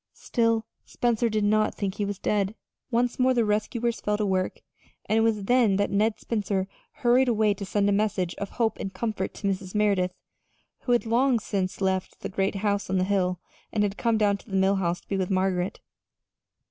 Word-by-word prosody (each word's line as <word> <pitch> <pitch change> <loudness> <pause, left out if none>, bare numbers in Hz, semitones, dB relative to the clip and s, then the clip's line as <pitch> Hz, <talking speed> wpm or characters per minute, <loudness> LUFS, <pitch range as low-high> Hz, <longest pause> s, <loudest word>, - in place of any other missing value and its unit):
Still, 230 -1 0 0.2
Spencer 235 -1 0
did 215 -1 0
not 215 +1 +2
think 195 -2 -2
he 205 0 -2
was 200 -1 -3
dead. 205 +1 0 0.3
Once 245 0 0
more 255 0 +4
the 235 -2 +3
rescuers 225 +3 -1
fell 210 0 0
to 210 - 0
work, 185 -1 -1 0.4
and 220 - +2
it - - +3
was 220 -2 +1
then 235 -2 +3
that 200 0 0
Ned 210 +2 +1
Spencer 200 -4 -1 0.4
hurried 250 +2 +5
away 215 -3 +3
to 200 0 -6
send 205 0 +1
a - - +3
message 200 -4 0
of 200 - -4
hope 230 -2 -1
and 195 - -4
comfort 215 -2 -3
to 200 - -3
Mrs. 190 0 -3
Merideth, 195 -4 +2 0.6
who 245 - 0
had 240 - +2
long 245 +3 +3
since 200 -3 -3
left 190 -1 -1
the - - -4
great 195 +1 -1
house 205 -1 0
on 190 - +1
the 185 - +2
hill 185 -2 0 0.3
and 210 - +1
had 200 -1 -1
come 230 0 +1
down 205 -2 +2
to - - -18
the 195 - 0
Mill 190 +1 +3
House 175 -2 -1
to - - -32
be 195 - -1
with 185 -1 -1
Margaret. 185 -1 0
205 Hz, 210 wpm, -26 LUFS, 190-225 Hz, 0.6 s, hurried